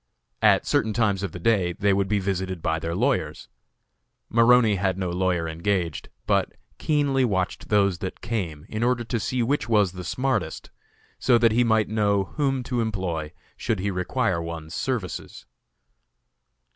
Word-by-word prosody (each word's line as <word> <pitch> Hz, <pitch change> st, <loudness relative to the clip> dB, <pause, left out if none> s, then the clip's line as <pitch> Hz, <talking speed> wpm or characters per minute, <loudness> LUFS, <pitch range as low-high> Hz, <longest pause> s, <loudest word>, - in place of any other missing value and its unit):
At -, -, +4 dB
certain 110 Hz, -1 st, +1 dB
times 105 Hz, -4 st, +1 dB
of 100 Hz, -4 st, -3 dB
the -, -, -7 dB
day 95 Hz, -3 st, +2 dB
they 100 Hz, +2 st, +1 dB
would 100 Hz, 0 st, +1 dB
be 105 Hz, +1 st, +1 dB
visited 95 Hz, -3 st, -2 dB
by 80 Hz, 0 st, 0 dB
their 85 Hz, +1 st, -3 dB
lawyers. 105 Hz, -, -1 dB, 0.8 s
Maroney 115 Hz, -2 st, +5 dB
had 95 Hz, 0 st, 0 dB
no 90 Hz, -2 st, -2 dB
lawyer 90 Hz, -2 st, 0 dB
engaged, 85 Hz, 0 st, -2 dB, 0.2 s
but -, -, +1 dB, 0.3 s
keenly 145 Hz, -3 st, +1 dB
watched 95 Hz, -6 st, -1 dB
those 100 Hz, -4 st, +2 dB
that 95 Hz, -, -5 dB
came, 90 Hz, -10 st, -4 dB
in 110 Hz, -, -4 dB
order 120 Hz, 0 st, +1 dB
to 115 Hz, 0 st, -2 dB
see 125 Hz, +3 st, -1 dB
which 135 Hz, +1 st, -1 dB
was 105 Hz, -5 st, +3 dB
the 90 Hz, 0 st, -8 dB
smartest, 130 Hz, +9 st, -2 dB, 0.5 s
so 125 Hz, -2 st, +4 dB
that 115 Hz, -1 st, +4 dB
he 120 Hz, +3 st, +3 dB
might 110 Hz, -2 st, +2 dB
know 100 Hz, -2 st, +1 dB
whom 135 Hz, -4 st, 0 dB
to 125 Hz, -1 st, -1 dB
employ 90 Hz, -8 st, -3 dB, 0.2 s
should 110 Hz, -, -1 dB
he 100 Hz, +2 st, -2 dB
require 90 Hz, -1 st, -1 dB
one's 85 Hz, -1 st, -6 dB
services. 120 Hz, -9 st, -4 dB
100 Hz, 160 wpm, -25 LUFS, 90-115 Hz, 0.8 s, Maroney